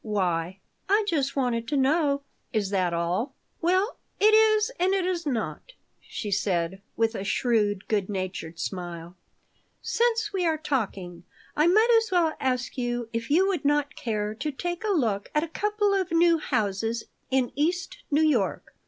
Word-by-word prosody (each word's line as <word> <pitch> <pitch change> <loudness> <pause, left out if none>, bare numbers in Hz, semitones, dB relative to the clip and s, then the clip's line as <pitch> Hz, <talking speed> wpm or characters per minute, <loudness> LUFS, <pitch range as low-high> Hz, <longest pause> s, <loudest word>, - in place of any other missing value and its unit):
Why?" 185 -3 -1 0.3
"I 415 +2 +3
just 280 -7 0
wanted 240 -4 0
to 290 - 0
know." 280 +1 +2 0.3
"Is 205 -4 -1
that 185 -3 +1
all?" 175 +10 -1 0.3
"Well, 370 +6 +1 0.2
it 430 +1 +5
is 435 +1 +5
and 375 +2 +3
it 380 -2 0
is 350 -3 -2
not," 260 - -3 0.3
she 210 - -6
said, 190 -1 0 0.2
with 225 0 +2
a 195 - -4
shrewd, 210 -2 +1
good 205 -3 0
natured 185 -4 -4
smile. 175 -1 -5 0.7
"Since 455 -3 +1
we 380 -2 0
are 325 -2 +2
talking, 195 - -3 0.3
I 305 +2 +4
might 435 +7 +5
as 445 - -7
well 340 -3 +3
ask 255 0 -1
you 240 -1 -2
if 230 0 -3
you 355 +7 +4
would 360 -7 -1
not 290 0 +1
care 210 -2 -2
to 300 +8 -3
take 350 +6 -4
a - - -1
look 225 - 0
at 300 - +3
a - - -3
couple 415 +4 0
of 380 -2 0
new 335 0 +4
houses 225 -3 -1 0.3
in 260 -2 +1
East 345 +6 -1
New 300 +2 +3
York." 235 -10 0
265 Hz, 170 wpm, -26 LUFS, -, 0.7 s, it